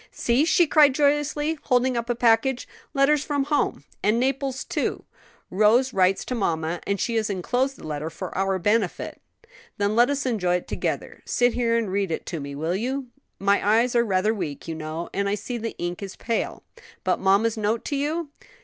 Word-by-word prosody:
"See!" 245 +6 +1
she 345 +1 +4
cried 290 -3 +5
joyously, 295 +2 +1
holding 255 -1 +2
up 235 0 -2
a 240 - +1
package; 240 +2 +2 0.3
"letters 275 +1 +3
from 285 -3 0
home, 290 +1 0 0.2
and 215 +3 +2
Naples 270 +1 -1
too. - - -2 0.5
Rose 225 +7 +3
writes 190 0 +2
to - - -3
mamma, 170 -6 -1
and 200 0 0
she 230 +3 0
has 215 -1 0
enclosed 245 +8 -1
the - - -11
letter 155 0 -3
for - - -7
our 195 0 +1
benefit." 205 +1 -1 0.6
"Then 205 +1 0
let 240 +2 +5
us 285 -1 -1
enjoy 190 -8 +1
it 180 - -3
together. - - -3
Sit 245 0 +2
here 230 -1 +1
and 220 -5 -1
read 195 -1 0
it 160 - -3
to 165 - -4
me; 140 0 -6
will 160 +5 -1
you? 255 +5 -3 0.3
My 200 +1 +2
eyes 230 +4 +3
are 235 - +5
rather 205 0 +1
weak, 165 -9 -5
you 165 - -3
know, 160 +1 -5
and 200 0 0
I 205 - +1
see 235 +4 -5
the 230 0 -5
ink 175 +2 -4
is 195 -1 -6
pale." 230 0 -3 0.4
"But - - +1
mamma's 200 +4 +3
note 220 +1 -1
to 290 - -2
you?" 300 +3 -2
225 Hz, 195 wpm, -24 LUFS, 190-260 Hz, 0.6 s, cried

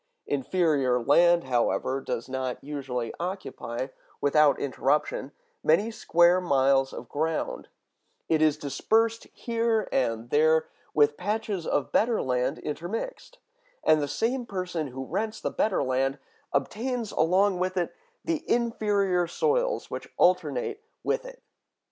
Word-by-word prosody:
Inferior 140 -3 +1
land, 170 +7 +4
however, 125 +1 0
does 115 - -4
not 130 -1 -3
usually 135 -5 -4
occupy, 170 -9 -4 0.3
without 145 0 +4
interruption, 140 0 0 0.3
many 205 +9 +3
square 175 -3 +4
miles 135 -4 +3
of - - -8
ground; 160 +2 -2 0.6
it 160 -1 +2
is 155 -1 +4
dispersed 225 +10 +1
here 230 -2 0
and 115 -2 -1
there, 160 +2 +4 0.3
with 145 -1 +4
patches 205 -2 -2
of 135 -5 0
better 230 0 +2
land 125 +3 0
intermixed, 220 - -5 0.5
and 155 -1 +4
the 145 - -1
same 240 - -1
person 180 -6 -3
who 130 +1 -6
rents 220 +9 -3
the - - -2
better 215 -3 +1
land 135 +2 0 0.3
obtains 225 - -2
along 185 +3 +2
with 185 +1 -1
it 175 - -1 0.3
the 330 -3 -1
inferior 205 -6 +1
soils 485 - 0
which - - -6
alternate 440 -4 +1 0.2
with - - -1
it. - - -11
165 Hz, 125 wpm, -27 LUFS, 135-215 Hz, 0.6 s, land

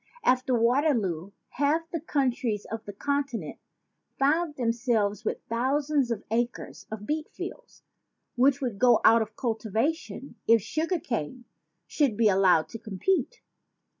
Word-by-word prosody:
After 255 0 +2
Waterloo, 230 - +1 0.2
half 300 +4 0
the 335 - -2
countries 255 -8 -1
of 225 0 -4
the 205 - -6
Conti 280 +1 -1
nent 155 -8 -7 0.6
found 300 +3 +1
themselves 230 -4 0
with - - -3
thousands 275 +3 +1
of 225 -3 -3
acres 235 +2 -3
of 215 -1 -7
beet 305 +5 -2
fields - - -9 0.5
which 265 +2 +3
would 240 -7 -3
go 240 -2 +5
out 230 +1 +7
of 220 0 -5
cultivation 240 - -2
if 230 -1 +6
cane 325 - -1
sugar 235 - -4 0.4
should 275 -9 0
be 225 -2 +4
allowed 185 -4 +4
to 225 - -8
compete. 250 - -1
245 Hz, 135 wpm, -27 LUFS, 220-285 Hz, 0.6 s, out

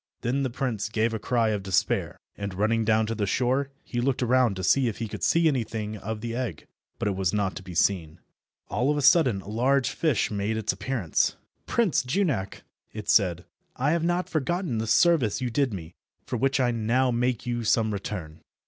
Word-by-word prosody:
Then 130 +4 0
the 130 - 0
prince 115 -4 -2
gave 110 +1 0
a 110 - -2
cry 115 0 +1
of 105 -2 -1
despair, 95 -2 0 0.2
and, 100 -2 -5
running 110 +3 +1
down 110 0 +3
to 115 - -2
the 105 -2 -2
shore, 130 +6 +1
he 120 - -3
looked 130 0 0
around 125 -3 +3
to 95 - -5
see 130 +7 +3
if 110 - -3
he 115 - -3
could - - -7
see 165 0 +3
anything 110 -6 -2
of 105 +1 -5
the 115 0 -4
egg, 120 - -4 0.3
but - - -2
it 100 - 0
was 95 +1 0
not 100 -2 0
to - - -6
be 90 -2 -10
seen. 85 -3 +1 0.5
All 125 +3 0
of 150 - +1
a 145 - -1
sudden 130 - +4
a - - -15
large 130 +5 +1
fish 155 -10 0
made 105 +2 -1
its 110 -1 0
appearance. 120 -11 0 0.3
"Prince 225 -9 +2
Junak," 130 - -1 0.3
it 105 0 -7
said, 90 -4 +3 0.3
"I 135 +4 +1
have 165 0 +1
not 175 +1 0
forgotten 155 - -1
the 110 - -2
service 125 - +3
you 125 -1 -2
did 135 +1 +1
me, 85 -4 -7 0.3
for - - -3
which 135 +4 +1
I 125 -2 +2
now 120 +3 +1
make 120 0 0
you 120 -1 -2
some 110 -1 +2
return." 90 -6 -6
115 Hz, 210 wpm, -26 LUFS, 105-130 Hz, 0.5 s, sudden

